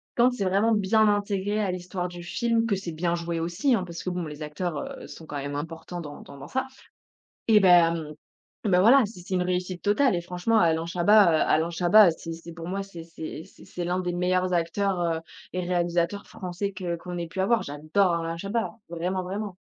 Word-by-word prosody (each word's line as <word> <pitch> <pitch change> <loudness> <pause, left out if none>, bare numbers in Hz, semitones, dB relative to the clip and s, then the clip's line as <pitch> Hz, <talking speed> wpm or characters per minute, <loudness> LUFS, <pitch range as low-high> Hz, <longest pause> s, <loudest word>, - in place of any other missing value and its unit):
quand 245 +1 +5
c'est 205 -6 -2
vraiment 200 +5 +3
bien 215 +1 +3
intégré 205 0 -1
à 195 -3 0
l'histoire 180 0 -4
du 175 -1 -9
film, 230 +4 0
que 220 -3 +1
c'est 185 -3 -5
bien 170 +2 0
joué 170 -1 -3
aussi 175 - +1
hein, 190 - -1
parce 170 -1 -7
que 185 - -2
bon 180 -1 -3
les 150 0 -8
acteurs, 150 +2 -3 0.3
heu, - - -9
sont 160 - -11
quand 150 - -8
même 140 +1 -4
importants 165 +3 -6
dans 145 -2 -9
dans 140 - -12
dans 140 - -9
ça. 260 +7 -1 0.8
Eh 215 -2 +7
ben, 170 -4 +4 0.5
ben 185 -4 +4
voilà 250 +5 +7
c'est 200 -4 -11
c'est 185 +2 -5
une 180 - +2
réussite 180 0 -2
totale 215 +3 +3
et 175 - 0
franchement 180 +6 0
Alain 165 -2 +2
Chabat, 185 +5 +5
heu, 155 - +3
Alain 160 +2 +2
Chabat 180 +3 +6
c'est 165 +1 -7
c'est 165 +1 -9
pour 165 0 -8
moi 195 +2 -2
c'est 175 -4 -10
c'est 165 -1 -8
c'est 195 - -17
c'est 175 - -5
l'un 180 +1 0
des 180 -1 -2
meilleurs 180 +1 +1
acteurs, 180 +3 0
heu, 165 -2 0 0.3
et 185 - 0
réalisateurs 175 +2 0
français 185 +2 -5
que 180 -2 -3
qu'on 175 +1 -7
ait 170 -1 -4
pu 190 +3 -4
avoir, 220 +4 +2
j'adore 155 +6 0
Alain 165 0 -3
Chabat 200 +6 -2 0.2
vraiment, 180 +2 -2
vraiment. 195 +1 -5
180 Hz, 215 wpm, -26 LUFS, 170-200 Hz, 0.8 s, Eh